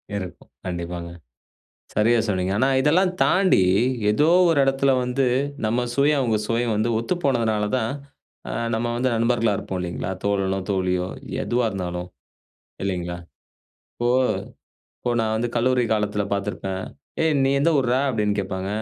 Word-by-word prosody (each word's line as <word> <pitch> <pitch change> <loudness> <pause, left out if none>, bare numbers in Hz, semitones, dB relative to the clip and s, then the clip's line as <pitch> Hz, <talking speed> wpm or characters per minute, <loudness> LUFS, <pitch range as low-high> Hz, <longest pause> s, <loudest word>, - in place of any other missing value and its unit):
இருக்கும். 95 -3 -7 0.2
கண்டிப்பாங்க. 85 -1 -4 0.9
சரியா 115 +2 +3
சொன்னீங்க. 95 -1 0
ஆனா 130 +3 +3
இதெல்லாம் 180 +6 +3
தாண்டி, 185 - +4 0.5
ஏதோ 150 +9 +3 0.2
ஒரு 155 -4 +3
இடத்துல 135 0 +2
வந்து, 125 +2 0 0.4
நம்ம 120 +3 0
சுவையும் 145 +1 +3
அவுங்க 115 -4 +1
சுவையும் 115 -1 0
வந்து 110 +3 +1
ஒத்துப்போனதினால 115 -7 0
தான், 110 0 -1 0.6
அ - - -3 0.2
நம்ம 120 +1 -1
வந்து 130 +1 +1
நண்பர்களா 115 -2 +2
இருப்போம் 95 -1 -4
இல்லைங்களா? 90 +1 -4
தோழனோ, 95 -1 0
தோழியோ 90 -1 0 0.4
எதுவா 120 -1 +1
இருந்தாலும், 90 -2 -4 0.8
இல்லைங்களா? 90 -2 -3 0.8
இப்போ 120 0 0 0.9
இப்போ 120 - -1
நான் 110 -1 0
வந்து 120 +2 -1
கல்லூரி 125 +1 +2
காலத்தில 105 -1 0
பார்த்திருப்பேன். 100 -1 -3 0.4
"ஏய் 160 -1 +3
நீ 135 - +2
எந்த 165 +3 +3
ஊர்றா?" 125 -1 +2
அப்படீன்னு 105 -5 0
கேப்பாங்க. 95 0 -3
110 Hz, 135 wpm, -23 LUFS, 95-125 Hz, 0.9 s, தாண்டி